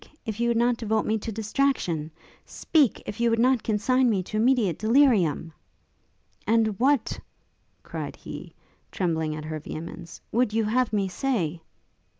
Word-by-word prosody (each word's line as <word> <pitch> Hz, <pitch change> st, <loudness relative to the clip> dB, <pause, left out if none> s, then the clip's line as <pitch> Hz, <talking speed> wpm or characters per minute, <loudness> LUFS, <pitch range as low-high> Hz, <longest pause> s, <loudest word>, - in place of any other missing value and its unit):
if 220 Hz, -2 st, -4 dB
you 235 Hz, -, +1 dB
would 235 Hz, -1 st, +2 dB
not 240 Hz, 0 st, +2 dB
devote 220 Hz, -1 st, 0 dB
me 220 Hz, -, +1 dB
to 225 Hz, -, -5 dB
distraction! 215 Hz, -, -1 dB, 0.3 s
Speak! 300 Hz, -, +1 dB
if 205 Hz, -, -6 dB
you 235 Hz, 0 st, +3 dB
would 230 Hz, -, +2 dB
not 250 Hz, +1 st, +3 dB
consign 245 Hz, +4 st, +2 dB
me 195 Hz, -4 st, +1 dB
to 215 Hz, -, -8 dB
immediate 220 Hz, -, +2 dB
delirium!' 215 Hz, -, +3 dB, 0.9 s
'And 225 Hz, 0 st, +3 dB
what,' 270 Hz, -1 st, +2 dB, 0.6 s
cried -, -, -6 dB
he, -, -, -9 dB, 0.4 s
trembling 160 Hz, -4 st, -1 dB
at 155 Hz, 0 st, -7 dB
her 155 Hz, 0 st, -4 dB
vehemence, 165 Hz, +3 st, -8 dB
'would 235 Hz, -2 st, +1 dB
you 225 Hz, 0 st, +2 dB
have 235 Hz, +2 st, +1 dB
me 200 Hz, -3 st, +1 dB
say?' 185 Hz, -, -2 dB
220 Hz, 150 wpm, -26 LUFS, 180-245 Hz, 0.9 s, you